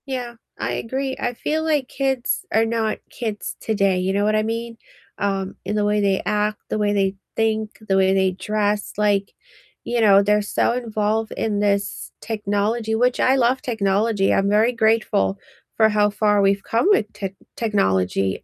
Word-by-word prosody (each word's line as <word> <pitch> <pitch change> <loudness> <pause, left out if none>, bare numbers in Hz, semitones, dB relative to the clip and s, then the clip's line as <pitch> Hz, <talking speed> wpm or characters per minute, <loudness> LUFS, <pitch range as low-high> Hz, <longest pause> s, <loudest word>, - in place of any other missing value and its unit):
Yeah, 250 -3 -4 0.2
I - - -2
agree 265 +3 -3
I 245 - -1
feel 310 +6 -2
like 300 -5 0
kids 270 -3 -1
are 225 +1 +4
not 225 -1 -1
kids 220 -3 -5
today, 195 -4 +1
you 185 +1 -1
know 200 +1 +1
what 215 0 +2
I 215 - +2
mean, 230 +1 -4 0.4
um, 195 -1 -2
in 205 +3 -3
the 210 -1 +1
way 210 0 +1
they 195 -1 +1
act, 210 0 0
the - - -1
way 205 -1 +1
they 195 -1 +1 0.2
think, 220 -1 -1
the 195 - +2
way 190 0 +3
they 190 -1 +2
dress, 205 +2 -1
like, 205 -1 +1 0.5
you 240 -1 -1
know, 200 -2 +6
they're 210 +1 +3
so, 205 - 0
involved 220 -2 -1
in 210 -2 -1
this 200 -1 -1
technology 220 +1 -1
which 245 +2 +1
I 260 - +4
love 255 0 +2
technology, 205 -4 +1
I'm 195 +1 +2
very 215 +4 +3
grateful 220 - +1 0.4
for 220 -1 +5
how 210 -1 +3
far 205 0 +2
we've 195 0 +2
come 230 +10 +1
with 220 - +2
tech 195 -1 -5 0.2
technology, 95 - 0
210 Hz, 175 wpm, -21 LUFS, 200-230 Hz, 0.5 s, know